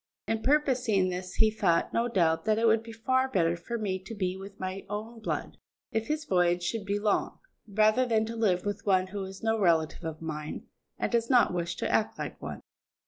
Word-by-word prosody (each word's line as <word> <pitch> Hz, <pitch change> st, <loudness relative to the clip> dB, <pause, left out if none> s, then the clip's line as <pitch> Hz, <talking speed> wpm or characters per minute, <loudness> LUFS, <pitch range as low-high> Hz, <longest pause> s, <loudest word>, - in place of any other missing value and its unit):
In 225 Hz, 0 st, 0 dB
purposing 250 Hz, -8 st, +2 dB
this 185 Hz, 0 st, -5 dB
he 220 Hz, -1 st, +4 dB
thought, 195 Hz, -6 st, +1 dB
no 230 Hz, +1 st, +2 dB
doubt, 165 Hz, -7 st, +2 dB
that 215 Hz, -1 st, +3 dB
it 230 Hz, -, +2 dB
would 220 Hz, 0 st, +4 dB
be 230 Hz, 0 st, -10 dB
far 260 Hz, +3 st, +1 dB
better 170 Hz, -7 st, +2 dB
for 175 Hz, +8 st, -5 dB
me 195 Hz, -4 st, -2 dB
to 195 Hz, +4 st, -9 dB
be 185 Hz, -2 st, -1 dB
with 195 Hz, +1 st, -10 dB
my 185 Hz, +1 st, -4 dB
own 220 Hz, +3 st, -5 dB
blood, 220 Hz, -, -4 dB, 0.3 s
if 220 Hz, 0 st, -1 dB
his 305 Hz, 0 st, -2 dB
voyage 175 Hz, -3 st, +2 dB
should 210 Hz, +3 st, -2 dB
be 200 Hz, +1 st, 0 dB
long, 205 Hz, -1 st, 0 dB, 0.3 s
rather 215 Hz, +4 st, +4 dB
than 220 Hz, -2 st, +2 dB
to 230 Hz, +1 st, -5 dB
live 195 Hz, -6 st, +1 dB
with 205 Hz, 0 st, -3 dB
one 185 Hz, -2 st, +3 dB
who 195 Hz, +1 st, -5 dB
is 190 Hz, +2 st, -10 dB
no 225 Hz, 0 st, +1 dB
relative 165 Hz, -5 st, +2 dB
of 160 Hz, -1 st, -5 dB
mine, 155 Hz, -2 st, -5 dB, 0.3 s
and -, -, -1 dB
does 230 Hz, -1 st, +1 dB
not 245 Hz, -7 st, +5 dB
wish 170 Hz, -1 st, -2 dB
to -, -, -2 dB
act 220 Hz, -, +1 dB
like -, -, -6 dB
one. -, -, -6 dB
205 Hz, 215 wpm, -29 LUFS, 185-225 Hz, 0.3 s, not